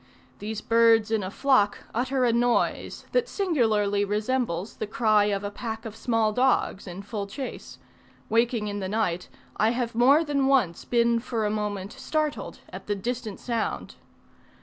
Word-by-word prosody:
These 215 Hz, +1 st, -4 dB
birds 230 Hz, -1 st, +4 dB
in 220 Hz, -2 st, +2 dB
a 185 Hz, -, -4 dB
flock 230 Hz, -2 st, +2 dB, 0.2 s
utter 255 Hz, +2 st, +1 dB
a 235 Hz, -, +3 dB
noise, 240 Hz, 0 st, 0 dB
that -, -, +2 dB
singularly 220 Hz, -, +1 dB
resembles 210 Hz, -2 st, -1 dB
the 215 Hz, -, -3 dB
cry 215 Hz, -1 st, +3 dB
of 200 Hz, -1 st, -1 dB
a 205 Hz, -, -3 dB
pack 225 Hz, 0 st, -6 dB
of 220 Hz, -1 st, -7 dB
small 225 Hz, -1 st, +1 dB
dogs 250 Hz, -5 st, +1 dB
in 185 Hz, +2 st, -7 dB
full 205 Hz, -1 st, -4 dB
chase: 265 Hz, +6 st, -7 dB, 0.5 s
waking 230 Hz, -1 st, +1 dB
in 205 Hz, 0 st, -3 dB
the 190 Hz, -1 st, -3 dB
night, 180 Hz, -5 st, -1 dB, 0.3 s
I 215 Hz, -, +3 dB
have 235 Hz, 0 st, -2 dB
more 265 Hz, +7 st, +5 dB
than 280 Hz, -3 st, +1 dB
once 240 Hz, -12 st, +2 dB
been 235 Hz, -1 st, +2 dB
for 230 Hz, -2 st, -2 dB
a 210 Hz, -, 0 dB
moment 205 Hz, -2 st, -3 dB
startled 305 Hz, -1 st, -3 dB
at -, -, -9 dB
the 205 Hz, -, 0 dB
distant 230 Hz, 0 st, -4 dB
sound. 235 Hz, -2 st, -3 dB
225 Hz, 165 wpm, -26 LUFS, 205-245 Hz, 0.5 s, more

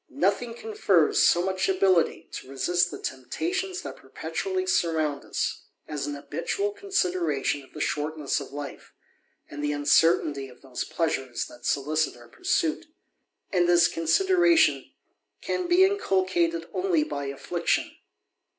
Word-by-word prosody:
Nothing 215 Hz, +5 st, 0 dB
confers 425 Hz, -, +2 dB
so 175 Hz, -, +4 dB
much 190 Hz, 0 st, 0 dB
ability 185 Hz, -3 st, +2 dB
to -, -, -8 dB
resist 175 Hz, +6 st, +1 dB
the -, -, -7 dB
temptation* 345 Hz, -, -3 dB
that -, -, -7 dB
perpetually 375 Hz, -1 st, -3 dB
surround 160 Hz, -, 0 dB
us, -, -, -3 dB, 0.2 s
as 150 Hz, -2 st, -3 dB
an 145 Hz, -, -3 dB
habitual 400 Hz, -, -2 dB
consideration 180 Hz, -, -1 dB
oT 135 Hz, -, -19 dB
the -, -, -6 dB
shortness 150 Hz, -1 st, -1 dB
of 140 Hz, -, -9 dB
life, 145 Hz, 0 st, -8 dB, 0.5 s
and 145 Hz, 0 st, -7 dB
the 145 Hz, -, +1 dB
uncertainty 145 Hz, -1 st, +3 dB
of 125 Hz, +1 st, -18 dB
those 130 Hz, -2 st, -4 dB
pleasure* 145 Hz, -6 st, -2 dB, 0.2 s
that 120 Hz, -, -8 dB
solicit 150 Hz, 0 st, 0 dB
our 120 Hz, -1 st, -16 dB
pursuit; 155 Hz, -, -1 dB, 0.6 s
and 175 Hz, -2 st, +2 dB
this 175 Hz, -1 st, +6 dB
consideration 340 Hz, -, +3 dB, 0.5 s
can 360 Hz, -, -2 dB
be? 350 Hz, -, +3 dB
THE 375 Hz, -, +7 dB
ADVENTURER. 400 Hz, +1 st, +3 dB
261 185 Hz, -, +2 dB
inculcated 165 Hz, 0 st, -6 dB
only 365 Hz, -4 st, +1 dB
by 140 Hz, -, -4 dB
affliction. 170 Hz, +5 st, -1 dB
170 Hz, 140 wpm, -26 LUFS, -, 0.6 s, THE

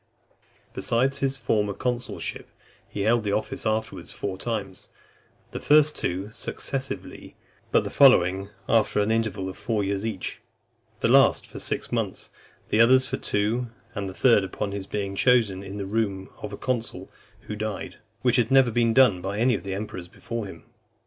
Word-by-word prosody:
XIV. -, -, -35 dB
Besides 130 Hz, +4 st, 0 dB
his 135 Hz, 0 st, 0 dB
former 105 Hz, -5 st, 0 dB
consulship, 125 Hz, -1 st, -3 dB, 0.4 s
he 105 Hz, -, -4 dB
held 115 Hz, +2 st, +3 dB
the 100 Hz, -1 st, -1 dB
office 110 Hz, -, -2 dB
afterwards 110 Hz, 0 st, -2 dB
four 95 Hz, -2 st, -4 dB
times; 100 Hz, -2 st, -5 dB, 0.6 s
the -, -, -5 dB
first 150 Hz, 0 st, +4 dB
two 95 Hz, +4 st, -3 dB
successively, 135 Hz, +4 st, -5 dB, 0.4 s
but -, -, +4 dB
the -, -, -5 dB
following, 95 Hz, -7 st, +5 dB, 0.2 s
after 110 Hz, -2 st, +2 dB
an 105 Hz, +1 st, +1 dB
interval 110 Hz, -4 st, -1 dB
of 95 Hz, -, -7 dB
four 110 Hz, -3 st, -1 dB
years 100 Hz, 0 st, -2 dB
each; 110 Hz, -5 st, -4 dB, 0.6 s
the -, -, +3 dB
last -, -, +5 dB
for -, -, -10 dB
six -, -, -3 dB
months, -, -, -3 dB, 0.4 s
the 110 Hz, -, +4 dB
others 130 Hz, +3 st, +6 dB
for -, -, -3 dB
two; 110 Hz, +4 st, -1 dB, 0.3 s
and 100 Hz, -4 st, -3 dB
the 95 Hz, -, -10 dB
third, 115 Hz, -6 st, +4 dB
upon 100 Hz, +1 st, -4 dB
his 100 Hz, -1 st, -5 dB
being 100 Hz, -1 st, -3 dB
chosen 110 Hz, -6 st, +3 dB
in 100 Hz, +1 st, -7 dB
the 100 Hz, -, -4 dB
room 100 Hz, -2 st, -2 dB
of 105 Hz, -, -5 dB
a 100 Hz, -, -6 dB
consul 120 Hz, -3 st, -3 dB, 0.3 s
who 105 Hz, -, -6 dB
died; 110 Hz, -1 st, -5 dB, 0.3 s
which 125 Hz, -2 st, +3 dB
had 120 Hz, -2 st, +2 dB
never 135 Hz, -3 st, +5 dB
been 115 Hz, 0 st, +2 dB
done 125 Hz, -9 st, +5 dB
by 95 Hz, +2 st, -3 dB
any 125 Hz, +3 st, +3 dB
of -, -, -2 dB
the 95 Hz, -1 st, -4 dB
emperors 95 Hz, -3 st, -6 dB
before 115 Hz, +4 st, -6 dB
him. 85 Hz, -4 st, -11 dB
110 Hz, 175 wpm, -25 LUFS, 100-120 Hz, 0.6 s, others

